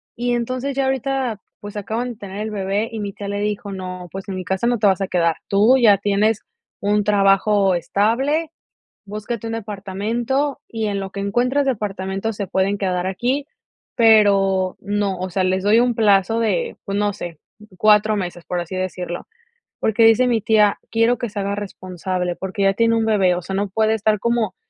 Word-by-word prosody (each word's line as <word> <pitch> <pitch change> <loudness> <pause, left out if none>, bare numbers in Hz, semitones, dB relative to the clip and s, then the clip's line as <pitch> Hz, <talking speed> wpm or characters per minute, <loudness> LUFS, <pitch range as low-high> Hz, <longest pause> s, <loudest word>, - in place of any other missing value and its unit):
Y 245 +1 -1
entonces, 255 +3 -2
ya 270 0 +1
ahorita, 265 -4 -1 0.2
pues, 205 0 -9
acaban 230 +4 -3
de - - -9
tener 200 -1 -8
el 215 +1 -3
bebé 200 +2 -1
y 225 - -5
mi 200 -1 -3
tía 200 - -7
le 200 0 -3
dijo: 205 0 -3
"No, 185 -1 -6
pues, 195 0 -7
en 190 - -3
mi 185 - -4
casa 190 +5 -1
no 240 -2 +1
te 210 - +4
vas 190 0 +2
a 195 - 0
quedar. 170 -3 +1
Tú 215 +6 +4
ya 220 -6 +6
tienes 205 +2 +1 0.4
un 205 +1 +1
trabajo 200 -1 +3
estable, 260 - 0 0.5
búscate 215 +2 -5
un 225 - -3
departamento, 225 +6 -2
y 225 -2 -3
en 200 -1 -1
lo 195 -1 -5
que 200 - -6
encuentras 245 +8 +1
departamento 200 -3 -2
se 200 -2 -4
pueden 190 +1 +1
quedar 185 -2 -1
aquí, 250 +9 -1 0.5
pero 200 -4 +4
no, 200 -1 -1
o 185 +1 -4
sea, 185 +1 0
les 185 0 0
doy 210 +3 +4
un 245 0 +2
plazo 210 0 +3
de, 470 - 0
pues 200 0 -2
no 205 0 +1
sé, 170 -4 -7 0.4
4 215 +1 +4
meses", 175 -3 -5
por 180 -1 -2
así 175 +2 -6
decirlo, 180 -2 -4 0.5
Porque, 220 +1 +3
dice 225 +3 +5
mi 235 -3 +1
tía, 210 -1 +3
quiero 230 +2 +2
que 240 - -3
se 205 - -5
haga 200 0 -1
responsable, 185 -3 -4
porque, 190 +2 -3
ya 195 0 +4
tiene 230 +2 +2
un 225 - +1
bebé, 195 -5 +3
o 180 - -5
sea, 190 - -4
no 200 +1 -1
puede 220 +3 +1
estar 215 -1 +1
como, 230 -4 0
205 Hz, 195 wpm, -21 LUFS, 195-225 Hz, 0.5 s, ya